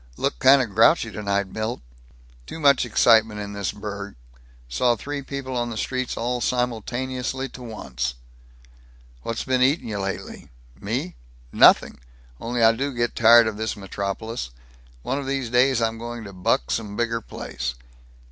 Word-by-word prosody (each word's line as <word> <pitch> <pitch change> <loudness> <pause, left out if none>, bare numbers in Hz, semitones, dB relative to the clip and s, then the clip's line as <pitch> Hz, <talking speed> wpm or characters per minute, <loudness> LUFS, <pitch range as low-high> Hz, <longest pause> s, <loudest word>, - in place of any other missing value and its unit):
Look - - -1
kind 135 0 +6
of 110 -5 -7
grouchy 115 - +4
tonight, 100 -1 -1
Milt." 110 +2 -3 0.7
"Too - - -7
much 140 -4 +4
excitement 110 -2 +4
in 100 0 -6
this 100 -1 -2
burg. 100 -1 -7 0.5
Saw 120 - +2
three 145 +6 -5
people 135 -1 -6
on 120 -1 -1
the 115 - -6
streets 130 +2 -2
all 125 +1 -2
simultaneously 125 +2 -2
to 125 - -12
once." 65 - -4 1.1
"What's 115 - -3
been 130 -1 0
eatin' 130 0 +2
you 105 -2 -3
lately?" 95 0 -5 0.3
"Me? - - -3 0.3
Nothing. - - +5 0.4
Only 120 0 -1
I 115 - +7
do 135 +4 -3
get 120 0 -1
tired 115 0 +7
of 110 -2 -3
this 110 -1 -3
metropolis. 100 - -4 0.5
One 135 - -1
of 140 - -6
these 135 -4 -2
days 125 -1 +3
I'm 115 0 -1
going 120 0 -6
to 100 -2 -9
buck 90 -9 0
some 105 -3 -3
bigger 115 0 -1
place." 60 - -5
115 Hz, 155 wpm, -23 LUFS, 105-125 Hz, 1.1 s, I